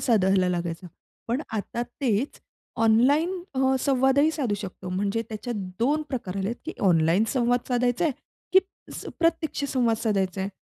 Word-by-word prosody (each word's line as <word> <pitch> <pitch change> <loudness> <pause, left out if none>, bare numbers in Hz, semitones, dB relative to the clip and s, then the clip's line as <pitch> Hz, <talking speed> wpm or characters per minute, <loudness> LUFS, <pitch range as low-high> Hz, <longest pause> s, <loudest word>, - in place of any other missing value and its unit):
साधायला 190 -5 +3
लागायचा. 175 0 -3 0.4
पण 245 +5 0
आता 225 +2 -3 0.2
तेच 250 0 0 0.5
ऑनलाईन 290 +11 +3
अ, 265 0 +2
संवादही 270 +3 +3
साधू 275 -10 -1
शकतो. 185 -2 -7
म्हणजे 200 +4 -1
त्याच्यात 230 +2 -5 0.2
2 290 +6 +2
प्रकार 210 -8 -4
आले 195 0 -1
आहेत 235 - -3
की 330 - -3 0.2
ऑनलाईन 165 +4 +4
संवाद 245 -1 +1
साधायच 245 +2 +1
आहे, 330 - +3 0.4
की 380 - +9 0.3
अस - - -8
प्रत्यक्ष 330 -3 0
संवाद 240 -4 +2
साधायच 195 -4 0
आहे. 190 +1 -1
235 Hz, 155 wpm, -26 LUFS, 195-270 Hz, 0.5 s, की